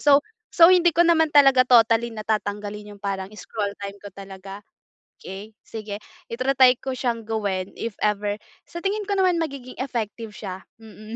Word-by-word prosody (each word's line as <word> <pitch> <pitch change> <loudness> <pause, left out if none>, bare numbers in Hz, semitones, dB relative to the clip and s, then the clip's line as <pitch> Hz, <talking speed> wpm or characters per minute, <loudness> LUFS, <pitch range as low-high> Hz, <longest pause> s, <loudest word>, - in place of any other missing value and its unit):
So 285 0 +5 0.3
so 335 +1 +8
hindi 350 -1 +5
ko 345 - +5
naman 325 -2 +4
talaga 270 -3 +6
totally 235 -1 +5
na 215 - -6
tatanggalin 210 -1 -3
'yong 200 - -19
parang 195 -1 -3
scroll 205 +1 -4
time 200 0 -7
ko 205 - -11
talaga. 195 +1 -10 0.6
Okey, 195 +3 -9
sige 215 -2 -6 0.4
ita-try 255 +1 +4
ko 265 - -3
siyang 235 -3 -2
gawin 200 -4 -2
if 230 - -3
ever. 205 -1 0 0.3
Sa 340 - -8
tingin 410 +2 -1
ko 405 - -1
naman 365 -2 +3
magiging 275 -6 -5
effective 230 -4 -4
siya, 190 -3 -7 0.2
mm. 215 0 -12
225 Hz, 165 wpm, -23 LUFS, 205-270 Hz, 0.6 s, so